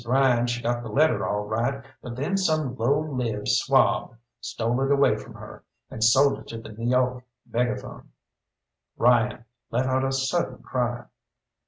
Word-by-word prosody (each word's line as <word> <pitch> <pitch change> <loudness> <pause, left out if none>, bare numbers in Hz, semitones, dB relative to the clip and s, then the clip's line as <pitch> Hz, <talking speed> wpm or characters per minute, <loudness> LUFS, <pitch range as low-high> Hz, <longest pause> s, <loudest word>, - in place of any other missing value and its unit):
Ryan 125 -1 +3
she 120 0 -3
got 120 0 0
the 115 - -7
letter 155 +8 +2
all 105 0 -1
right, 120 +6 -2 0.2
but 120 -2 -7
then 140 +10 -1
some 155 -8 0
low 135 +6 +1
lived 125 -8 -3
swab - - +2 0.2
stole 120 +3 -2
it 135 - +1
away 140 -6 +4
from 105 - -10
her, - - -11 0.3
and 110 - -3
sold 135 +4 +4
it - - -14
to 115 - -6
the 115 - -11
N' 115 +2 -5
York 125 0 +1 0.2
Megaphone." 120 +1 -3 0.9
Ryan 120 0 +2 0.2
let 125 +3 0
out 130 0 +1
a 135 - 0
sudden 135 +6 -1
cry. 120 -2 -2
125 Hz, 165 wpm, -25 LUFS, 120-135 Hz, 0.9 s, away